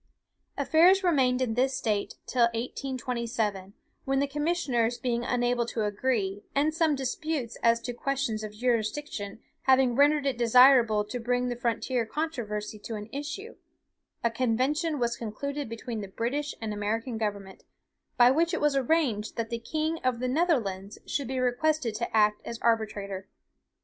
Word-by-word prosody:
"Affairs 340 +7 +5
remained 260 -7 +3
in 230 -3 -1
this 260 +3 +1
state 210 -3 -1
till 245 -2 +3
1827, 235 -5 -3 0.3
when 270 0 0
the 280 - +2
commissioners 280 -6 0
being 240 -1 -1
unable 245 -1 0
to 225 -2 -2
agree, 205 -2 -1
and 295 +3 +2
some 320 -2 +2
disputes 270 -1 -3
as 230 0 +4
to 245 +1 -4
questions 245 -4 -2
of 215 - -5
jurisdiction 225 -1 -2 0.2
having 260 -2 +4
rendered 290 +1 +4
it 265 -3 -1
desirable 235 -3 +6
to 230 +4 -5
bring 245 +1 0
the 245 - -2
frontier 240 +1 -1
controversy 220 -7 -4
to 225 +2 -6
an 210 +1 -7
issue, 305 +11 -6 0.7
a 235 - +2
convention 260 +7 0
was 235 -2 0
concluded 280 +5 -4
between 230 -1 -5
the 200 - -6
British 265 +9 -3
and 220 -2 -4
American 225 +3 -2
government, 200 -3 -4 0.5
by 245 0 +7
which 330 +5 +2
it - - -2
was 295 -1 +2
arranged 260 -6 +1
that 230 0 -3
the 235 - -2
king 315 +6 -2
of 255 -4 0
the 255 - -1
Netherlands 240 - 0
should 280 -3 -2
be 260 +1 -3
requested 255 0 +1
to 225 0 -2
act 210 0 +3
as 235 - -6
arbitrator. 205 -4 -1
245 Hz, 155 wpm, -28 LUFS, 225-280 Hz, 0.7 s, by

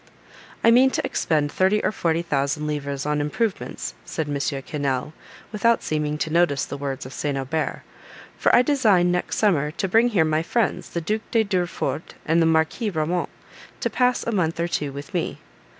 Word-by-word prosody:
"I 230 - +7
mean 255 +3 +6
to - - -2
expend 150 -2 0
thirty 190 +3 +2
or - - +2
forty 170 -4 0
thousand 145 -1 -1
livres 140 -2 -3
on 150 0 0
improvements," 185 +8 -2
said 160 -2 -4
M. 145 - -3 0.3
Quesnel, 140 -1 -2 0.4
without 230 +2 +2
seeming 150 -1 -1
to 155 - -2
notice 165 -5 +2
the - - -6
words 140 -2 -4
of 130 - -9
St. 145 -2 -2
Aubert; 135 +4 -2 0.5
"for - - +3
I 245 - +6
design, 210 -11 +3
next 180 0 -1
summer, 160 -9 +2
to 185 +5 -3
bring 225 +6 +4
here 195 -9 +2
my 155 0 +1
friends, 225 +6 -1
the 170 - -3
Duke 215 +6 -3
de 225 -1 +3
Durefort 175 -7 -2
and 165 +2 +3
the 165 - +4
Marquis 160 +8 +1
Ramont, 170 0 -1 0.5
to - - -1
pass 250 -1 +2
a 235 - -1
month 165 -5 0
or 170 - +1
two 150 -4 -2
with 140 +1 -9
me." - - -2
160 Hz, 185 wpm, -23 LUFS, 150-205 Hz, 0.5 s, I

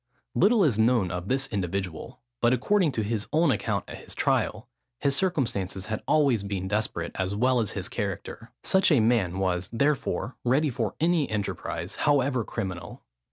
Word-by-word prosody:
Little 215 -1 +4
is 125 - +2
known 110 -5 +3
of 90 +1 -4
this 135 +3 +1
individual: 95 +4 -4 0.2
but 120 +1 +4
according 175 - +2
to 110 - -1
his 105 0 -2
own 155 0 +3
account 105 -6 -1
at - - -8
his - - -9
trial, - - 0 0.3
his 140 +1 +1
circumstances 115 - -1
had 110 -1 -3
always 140 -8 +3
been 100 -2 -3
desperate, 100 -5 -2
as 95 +1 -1
well 125 +3 +3
as 110 -4 -1
his - - -3
character. 115 0 -5
Such 190 -2 +4
a 145 - +5
man 110 -6 +2
was, 90 -1 -1
therefore, 135 0 0
ready 140 +4 +2
for 115 -5 -2
any 165 -2 +2
enterprise, 105 -2 -3
however 135 -4 +2
criminal. 95 -6 -6
115 Hz, 165 wpm, -27 LUFS, 100-140 Hz, 0.3 s, a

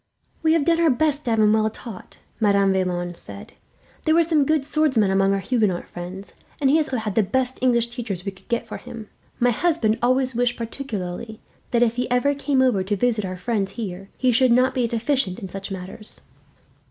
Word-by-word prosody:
"We 320 0 +3
have 325 -4 +2
done 335 -1 +3
our 330 - +5
best 295 +2 +1
to - - -1
have 225 -1 +2
him 215 0 +5
well 220 0 +2
taught," 220 -2 -11 0.2
Madame 200 -3 +3
Vaillant 175 -2 -1
said. 100 -9 -10 0.5
"There 315 0 +2
were 335 - +5
some 315 -3 +2
good 310 -3 +2
swordsmen 265 -10 +2
among 195 0 +3
our 195 - +2
Huguenot 210 -5 0
friends, 180 +3 -8 0.3
and 270 -2 +3
he 305 - +5
has 310 -1 +1
also 260 - -2
had 215 -3 -3
the 220 - +3
best 260 +5 -1
English 235 -2 +2
teachers 225 -7 -5
we 195 - -2
could 190 0 -21
get 235 0 -1
for - - -6
him. 230 -4 -10 0.3
My 245 0 +4
husband 240 -5 +1
always 255 +1 +2
wished, 245 +1 0
particularly, 220 -3 -5 0.3
that 240 0 +3
if 235 0 0
he 250 - -1
ever 250 +4 +2
came 280 -2 +1
over 225 -8 +2
to 205 +2 -1
visit 220 0 +1
our 185 0 -5
friends 200 -1 -2
here, 195 -4 -6
he 255 -1 +2
should 255 +1 +4
not 255 +2 +4
be 250 -2 +1
deficient 235 -4 -1
in 195 -5 -7
such 195 +2 -7
matters." 190 +3 -7
230 Hz, 215 wpm, -23 LUFS, 195-260 Hz, 0.5 s, our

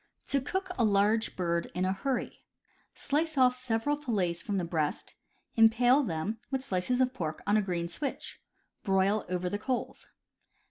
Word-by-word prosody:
To 275 -1 +2
Cook 375 +7 -3
a - - +4
Large 210 +1 +2
Bird 170 -2 -1
iii 180 - 0
a 185 - +1
Hurry. 250 +6 -3 0.3
— - - -38
Slice 310 +1 0
off 250 -1 +5
several 250 +3 -1
fillets 200 - -1
from 205 -2 -2
the 180 - -1
breast; 160 -3 -2 0.4
impale 240 +4 +5
them, 205 - -3
with 265 -1 -2
slices 225 +2 0
of 255 0 +2
pork, 160 -9 -4
on 205 - +2
a 215 - +4
green 175 -3 -2
switch; 270 - -5 0.4
broil 195 0 +2
over 180 0 -1
the 205 +3 -2
coals. 255 +3 -3
215 Hz, 170 wpm, -30 LUFS, 185-255 Hz, 0.4 s, off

